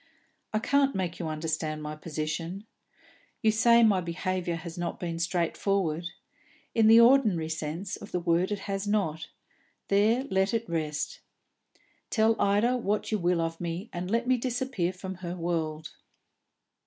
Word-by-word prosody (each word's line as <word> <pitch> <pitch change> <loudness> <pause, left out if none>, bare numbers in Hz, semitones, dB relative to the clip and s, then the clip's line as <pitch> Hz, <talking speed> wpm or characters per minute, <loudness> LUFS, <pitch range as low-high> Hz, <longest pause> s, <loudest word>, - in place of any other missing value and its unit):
I 215 - +1
can't 275 +5 +2
make 180 -3 -2
you 170 - -3
understand 155 0 -3
my 150 0 -5
position. 165 +5 -4 0.8
You 220 - +5
say 235 +2 +5
my 200 -4 +4
behaviour 175 0 -2
has 165 0 -7
not 175 -1 -4
been 165 -2 -4
straightforward. 170 0 0 0.7
In 225 -2 +4
the 225 +1 +8
ordinary 230 -10 +5
sense 160 +4 -4
of 205 - -11
the 180 - 0
word 175 +2 +1
it 205 - -2
has 195 0 -3
not; 190 -7 0 0.6
there 215 +6 +3
let 190 +3 +2
it 230 0 -2
rest. 150 -3 -3 0.9
Tell 220 0 +3
Ida 210 +5 +3
what 210 -2 -1
you 215 - +1
will 175 -1 +1
of 165 0 -3
me, 175 +6 -4
and 175 +1 -4
let 230 +3 +1
me 255 0 +3
disappear 245 -6 -1
from 190 +1 -7
her 175 -1 -4
world." 160 -3 -3
185 Hz, 155 wpm, -28 LUFS, 165-215 Hz, 0.9 s, the